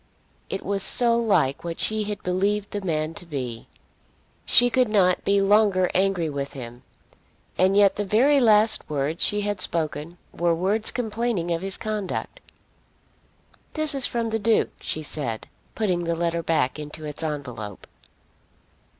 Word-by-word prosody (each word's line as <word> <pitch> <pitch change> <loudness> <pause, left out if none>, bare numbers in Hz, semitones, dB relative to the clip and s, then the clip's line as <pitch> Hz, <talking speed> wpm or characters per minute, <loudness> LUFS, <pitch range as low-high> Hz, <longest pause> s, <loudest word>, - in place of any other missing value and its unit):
It 195 - -4
was 200 0 -1
so 235 +3 +3
like 190 - +1
what 170 -1 -5
she 215 -1 0
had 205 0 -5
believed 200 +3 0
the 205 - -3
man 155 -3 -2
to 185 - -9
be! 125 -7 -5 0.8
She 245 0 +5
could 255 +1 +3
not 190 -4 +2
be 200 0 +2
longer 200 -2 +3
angry 190 -3 +1
with 140 -2 -4
him. 120 -2 -9 0.7
And 190 +2 +3
yet 200 -1 +4
the 205 - 0
very 250 +9 +3
last 215 -2 +4
words 150 +2 -1
she 210 0 +1
had 205 -2 -2
spoken 165 -1 -2 0.2
were 170 -1 +1
words 200 +6 +1
complaining 225 -6 -2
of 165 0 -1
his 195 0 -4
conduct. 215 - -4 1.3
"This 310 -2 +2
is 270 -2 +1
from 230 -1 -2
the 225 - 0
Duke," 220 +1 +2
she 155 - -4
said, 130 -7 0 0.3
putting 180 -6 0
the 170 0 0
letter 170 0 -1
back 155 -4 0
into 150 +1 -8
its 150 +1 -4
envelope. 125 - -5
190 Hz, 155 wpm, -24 LUFS, 155-215 Hz, 1.3 s, She